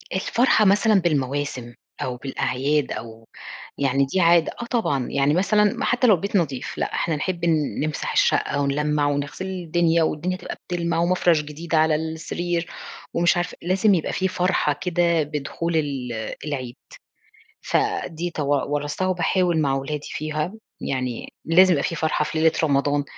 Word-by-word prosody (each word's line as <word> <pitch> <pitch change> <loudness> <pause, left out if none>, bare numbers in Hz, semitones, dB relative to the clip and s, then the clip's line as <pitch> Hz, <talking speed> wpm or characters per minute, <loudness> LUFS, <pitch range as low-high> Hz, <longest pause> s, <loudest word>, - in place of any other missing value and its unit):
الفرحة 220 +3 +3
مثلًا 205 +1 +4
بالمواسم 140 -5 -1 0.3
أو 125 -1 -3
بالأعياد 135 +2 -1
أو 115 0 -8 0.5
يعني 140 0 +2
دي 160 +8 -1
عادة، 170 -1 +4
آه - - -4
طبعًا، 145 - 0
يعني 140 +1 +2
مثلًا 200 +4 +3
م - - -4
حتى 245 +1 +2
لو 215 - +7
البيت 200 +3 -2
نضيف، 140 -8 -2
لأ، - - -2
إحنا 160 -3 0
نحب 175 +2 -3 0.4
نمسح 155 0 -2
الشقة 145 - +2
ونلمّع 150 +1 +1
ونغسل 145 +6 -2
الدنيا 175 -2 +1
والدنيا 170 +4 -1
تبقى 180 - -7
بتلمع، 170 -1 -1
ومفرش 175 -2 +3
جديد 155 +3 -6
على 155 0 +4
السرير، 165 +2 -3 0.5
ومش 175 +1 +3
عارفة 175 0 -2
لازم 190 +4 +3
يبقى 165 - -1
في 190 - 0
فرحة 180 -5 +1
كده 170 -2 +2
بدخول 150 +3 -3
ال 140 -5 -2 0.3
العيد، 130 -4 -4 0.9
فدي 170 +2 -1
تو 150 -4 -3 0.3
ورّثتها 145 +5 -1
وباحاول 180 -1 +1
مع 135 -2 +1
ولادي 145 +2 -4
فيها، 155 +3 -3 0.3
يعني 130 -3 -3 0.2
لازم 185 +3 +6
يبقى 140 - 0
في 165 - -2
فرحة 155 -1 0
في 160 - -4
ليلة 160 0 +5
رمضان 145 -1 +2
160 Hz, 150 wpm, -23 LUFS, 145-175 Hz, 0.9 s, لو